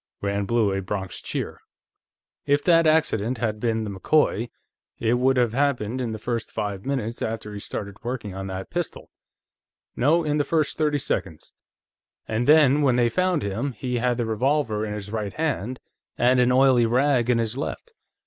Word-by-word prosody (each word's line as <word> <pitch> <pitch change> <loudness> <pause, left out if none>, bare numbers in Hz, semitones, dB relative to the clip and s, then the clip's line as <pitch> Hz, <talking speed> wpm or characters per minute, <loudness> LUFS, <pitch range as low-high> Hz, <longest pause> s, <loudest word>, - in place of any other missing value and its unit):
Rand 100 0 -2
blew 115 -3 +2
a 95 - -1
Bronx 95 0 -5
cheer. - - -4 0.9
"If 145 0 +2
that 165 -2 +5
accident 130 -7 +2
had 110 -2 -2
been 115 -1 0
the 105 - -4
McCoy, 120 +2 +1 0.5
it 120 +2 +1
would 130 +1 +3
have 120 -3 +2
happened 130 -3 0
in 120 -3 -2
the 110 - -4
first 115 +1 -3
five 100 +1 -4
minutes 120 -4 -2
after 110 -1 -4
he 100 - -6
started 100 -1 -6
working 120 -5 -4
on 95 0 -5
that 95 0 -6
pistol. 175 -1 -4 0.8
No, 155 +7 +3
in 150 -1 0
the - - +3
first 155 -1 0
thirty 150 -2 +1
seconds. 95 - -3 0.7
And 110 +2 -1
then, 150 -2 +6
when 135 -4 +3
they 120 -1 +3
found 180 +1 +1
him, 110 +8 -2
he 125 +2 -3
had 120 0 +1
the 120 - -1
revolver 110 -1 0
in 105 - -4
his 100 -1 -7
right 105 -3 -3
hand, 130 -6 -2 0.4
and 125 +1 +4
an 125 0 +4
oily 130 -2 +5
rag 125 0 +2
in 125 - +4
his 115 0 -1
left. 455 - -5
120 Hz, 180 wpm, -24 LUFS, 105-140 Hz, 0.9 s, then